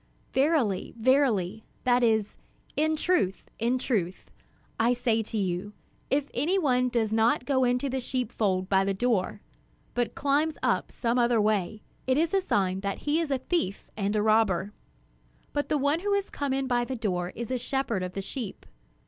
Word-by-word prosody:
"Verily, 265 Hz, -, +1 dB
verily 220 Hz, -5 st, +2 dB, 0.2 s
(that 245 Hz, 0 st, +3 dB
is, 220 Hz, -3 st, +1 dB, 0.4 s
'in 315 Hz, +1 st, +2 dB
truth, 310 Hz, -, +1 dB, 0.2 s
in 235 Hz, +3 st, +1 dB
truth'), 195 Hz, -9 st, -2 dB, 0.5 s
I 235 Hz, +2 st, +4 dB
say 235 Hz, -2 st, +1 dB
to 220 Hz, 0 st, -4 dB
you, 190 Hz, +1 st, -2 dB, 0.4 s
if 280 Hz, +1 st, 0 dB
any 315 Hz, +10 st, +1 dB
one 255 Hz, -7 st, +2 dB
does 225 Hz, -3 st, 0 dB
not 225 Hz, +2 st, +2 dB
go 265 Hz, -2 st, +2 dB
into 250 Hz, +2 st, +1 dB
the 265 Hz, 0 st, -1 dB
sheepfold 215 Hz, -7 st, -1 dB
by 195 Hz, 0 st, +3 dB
the 195 Hz, 0 st, 0 dB
door, 220 Hz, -3 st, 0 dB, 0.5 s
but 245 Hz, -1 st, -1 dB
climbs 290 Hz, +3 st, +1 dB
up -, -, +1 dB
some 240 Hz, 0 st, 0 dB
other 235 Hz, -1 st, +3 dB
way, 210 Hz, -1 st, 0 dB, 0.2 s
it 260 Hz, +1 st, +3 dB
is 330 Hz, +3 st, +1 dB
a 390 Hz, -, +3 dB
sign 190 Hz, -, 0 dB
that 200 Hz, 0 st, -3 dB
he 300 Hz, +2 st, +2 dB
is 330 Hz, -3 st, -1 dB
a 270 Hz, -, +1 dB
thief 260 Hz, -, -2 dB
and 205 Hz, 0 st, -1 dB
a 210 Hz, -, +2 dB
robber. 210 Hz, -3 st, +2 dB, 0.8 s
But 290 Hz, 0 st, -1 dB
the 300 Hz, -, +2 dB
one 285 Hz, +3 st, +1 dB
who 400 Hz, +2 st, +1 dB
comes 280 Hz, -2 st, -1 dB
in 270 Hz, 0 st, -1 dB
by 245 Hz, -2 st, +1 dB
the 260 Hz, +2 st, -4 dB
door 180 Hz, -6 st, -1 dB
is 235 Hz, +1 st, -5 dB
a 255 Hz, -, 0 dB
shepherd 250 Hz, -5 st, -1 dB
of 180 Hz, 0 st, -4 dB
the 195 Hz, -, -3 dB
sheep. 225 Hz, 0 st, -6 dB
240 Hz, 180 wpm, -28 LUFS, 205-270 Hz, 0.8 s, I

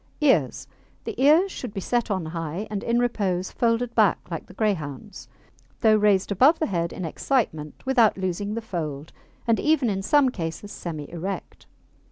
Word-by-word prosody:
EARS 165 Hz, -, +2 dB, 0.4 s
The -, -, -4 dB
ears 330 Hz, +7 st, +5 dB
should 245 Hz, -10 st, -7 dB
be -, -, -2 dB
set 240 Hz, +4 st, -1 dB
on 190 Hz, -5 st, -1 dB
high, 165 Hz, +4 st, -4 dB
and, 205 Hz, -2 st, -2 dB
in 235 Hz, 0 st, +1 dB
repose, 195 Hz, -7 st, 0 dB
folded 235 Hz, 0 st, 0 dB
back 215 Hz, -5 st, +4 dB
like 165 Hz, -, -5 dB
the 185 Hz, -, -14 dB
Greyhound's, 195 Hz, -3 st, -3 dB, 0.5 s
though 220 Hz, -2 st, +5 dB
raised 205 Hz, -2 st, +3 dB
above 270 Hz, -, +5 dB
the 315 Hz, -, 0 dB
head 170 Hz, -, -1 dB
in 185 Hz, -, -5 dB
excitement 160 Hz, -, -2 dB
without 240 Hz, -6 st, +4 dB
losing 190 Hz, +3 st, -2 dB
the 230 Hz, -, -4 dB
fold, 155 Hz, -7 st, -5 dB, 0.3 s
and 230 Hz, -1 st, +2 dB
even, 295 Hz, -7 st, +2 dB
in 195 Hz, -1 st, -2 dB
some 275 Hz, +6 st, +4 dB
cases, 175 Hz, -1 st, -5 dB
semi 155 Hz, -4 st, -6 dB
erect. 180 Hz, +3 st, -6 dB
205 Hz, 170 wpm, -25 LUFS, 170-235 Hz, 0.5 s, ears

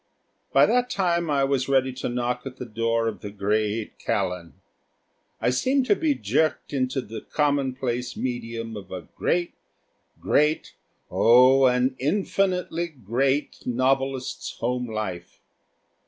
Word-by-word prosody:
By -, -, +6 dB
that 250 Hz, 0 st, +2 dB
time 170 Hz, -6 st, 0 dB
I 140 Hz, -2 st, +2 dB
was 135 Hz, -1 st, 0 dB
ready 130 Hz, -1 st, +2 dB
to 130 Hz, -, -4 dB
knock 125 Hz, 0 st, -1 dB
at 130 Hz, -1 st, -9 dB
the 125 Hz, -, -6 dB
door 115 Hz, 0 st, 0 dB
of 110 Hz, -, -4 dB
the 105 Hz, -, -6 dB
great 105 Hz, +2 st, -1 dB
Callan. 90 Hz, -4 st, -2 dB, 0.9 s
I -, -, +2 dB
seemed 260 Hz, -, +1 dB
to 410 Hz, -, +4 dB
be 315 Hz, -6 st, +1 dB
jerked 160 Hz, -, 0 dB
into 130 Hz, 0 st, 0 dB
the 115 Hz, -2 st, -8 dB
commonplace 130 Hz, -4 st, -1 dB
medium 115 Hz, -2 st, -4 dB
of 100 Hz, -2 st, -9 dB
a 95 Hz, -, -5 dB
great, 175 Hz, 0 st, 0 dB, 0.7 s
great 150 Hz, +2 st, +1 dB, 0.4 s
oh, 130 Hz, +3 st, +6 dB
an 125 Hz, +1 st, +2 dB
infinitely 180 Hz, +1 st, 0 dB
great 135 Hz, -, -1 dB
novelist's 130 Hz, +1 st, 0 dB
home 125 Hz, +1 st, -1 dB
life. 95 Hz, -6 st, -5 dB
130 Hz, 130 wpm, -25 LUFS, 115-145 Hz, 0.9 s, By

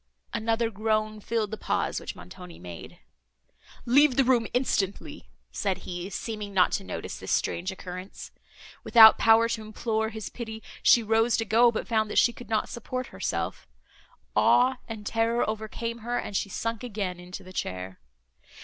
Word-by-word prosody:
Another 225 Hz, +1 st, 0 dB
groan 215 Hz, 0 st, -1 dB
filled 220 Hz, -1 st, -2 dB
the 220 Hz, -, -4 dB
pause -, -, -1 dB
which -, -, -7 dB
Montoni 170 Hz, -, -11 dB
made. 85 Hz, -1 st, -10 dB, 0.9 s
"Leave 275 Hz, +2 st, +5 dB
the 270 Hz, -, +4 dB
room 245 Hz, -3 st, +2 dB
instantly!" 205 Hz, -6 st, -2 dB, 0.2 s
said 190 Hz, -2 st, -2 dB
he, 175 Hz, +1 st, -5 dB
seeming 205 Hz, 0 st, -5 dB
not 180 Hz, -1 st, +4 dB
to 195 Hz, -, -1 dB
notice -, -, -6 dB
this -, -, -5 dB
strange 185 Hz, +3 st, 0 dB
occurrence. 185 Hz, 0 st, -8 dB, 0.5 s
Without 220 Hz, -2 st, +8 dB
power 225 Hz, +1 st, +5 dB
to 225 Hz, -, -2 dB
implore 220 Hz, 0 st, -2 dB
his 220 Hz, -2 st, -6 dB
pity, 220 Hz, -2 st, -7 dB, 0.2 s
she 235 Hz, -, +6 dB
rose 225 Hz, +1 st, +2 dB
to 225 Hz, -, -1 dB
go, 230 Hz, +3 st, +5 dB
but 220 Hz, -, -4 dB
found 220 Hz, -2 st, +1 dB
that -, -, -3 dB
she 240 Hz, -, +5 dB
could 240 Hz, -2 st, -12 dB
not 220 Hz, -1 st, 0 dB
support 255 Hz, +2 st, -5 dB
herself; -, -, -3 dB, 0.7 s
awe 255 Hz, +1 st, +4 dB
and 220 Hz, -2 st, -7 dB
terror 230 Hz, +2 st, +1 dB
overcame 220 Hz, +2 st, -4 dB
her, 240 Hz, +2 st, -2 dB
and 205 Hz, -, -4 dB
she 200 Hz, -, -1 dB
sunk 230 Hz, +3 st, -3 dB
again 200 Hz, -6 st, -4 dB
into 180 Hz, +2 st, -9 dB
the 185 Hz, 0 st, -12 dB
chair. 95 Hz, -, -5 dB
220 Hz, 165 wpm, -27 LUFS, 195-230 Hz, 0.9 s, Without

